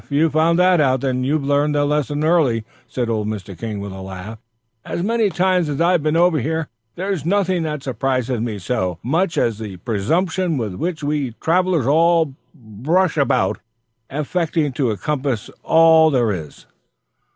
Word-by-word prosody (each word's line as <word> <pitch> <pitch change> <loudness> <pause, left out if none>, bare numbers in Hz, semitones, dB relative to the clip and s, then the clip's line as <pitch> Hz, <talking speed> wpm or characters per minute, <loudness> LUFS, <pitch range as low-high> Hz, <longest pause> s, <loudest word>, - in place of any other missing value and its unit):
"If - - -27
you've 150 +2 +2
found 165 +2 +3
that 180 -2 +4
out, 130 -2 +1
you've 135 +3 0
learned 145 +1 +1
the 145 0 +2
lesson 150 0 -1
early," 150 -9 +2 0.2
said 125 -2 -3
old 110 -2 -1
Mr. 100 -3 -5
King, 105 +4 -5
with 100 0 -6
a 95 0 -8
laugh. 95 +3 -8 0.4
"As 170 - -4
many 225 0 +1
times 180 -3 +1
as 145 - -3
I've 175 0 +3
been 155 +1 0
over 175 -2 +3
here, 160 +4 -2 0.3
there's 190 -4 -3
nothing 185 0 +1
that 150 -3 -4
surprises 130 -1 -1
me 115 -3 -3
so 95 -3 -2
much 165 +6 0
as 115 -6 +1
the 105 -4 -7
presumption 160 - -1
with 110 -6 -3
which 160 - -4
we 145 -5 -2
travellers 175 -4 +1
all 165 +1 +3 0.5
rush 170 +4 +2
about, 135 -10 +1 0.5
expecting 150 +1 -1
to 125 -5 -1
compass 135 -1 -2
all 160 -1 +5
there 120 -6 +1
is." 80 -7 -7
145 Hz, 165 wpm, -20 LUFS, 120-165 Hz, 0.5 s, all